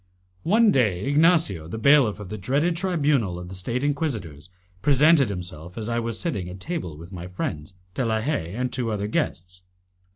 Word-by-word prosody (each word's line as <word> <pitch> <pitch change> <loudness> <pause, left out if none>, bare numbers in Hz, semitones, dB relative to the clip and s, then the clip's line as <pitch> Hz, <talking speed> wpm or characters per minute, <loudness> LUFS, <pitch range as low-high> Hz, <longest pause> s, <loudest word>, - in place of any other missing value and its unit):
One 215 +4 +4
day, 105 - +1
Ignacio, 145 - +3
the 100 - -5
bailiff 125 -3 +4
of 105 -3 -8
the 110 - -5
dreaded 145 - +1
tribunal 150 - +1
of 90 0 -8
the - - -8
State 115 +8 -2
inquisitors, 115 - -2 0.3
presented 145 -1 +5
himself 90 -2 -7
as 110 -1 -4
I 120 0 0
was 115 -1 -3
sitting 100 - -3
at 90 +1 -9
table 125 - -5
with 85 +4 -11
my 90 -2 -7
friends, 80 -2 -5 0.2
De 130 - -1
la 110 -2 +1
Haye, 110 - -2
and 125 +1 -2
two 125 -3 -1
other 105 -2 -2
guests. 90 -3 -3
110 Hz, 185 wpm, -24 LUFS, 90-145 Hz, 0.3 s, presented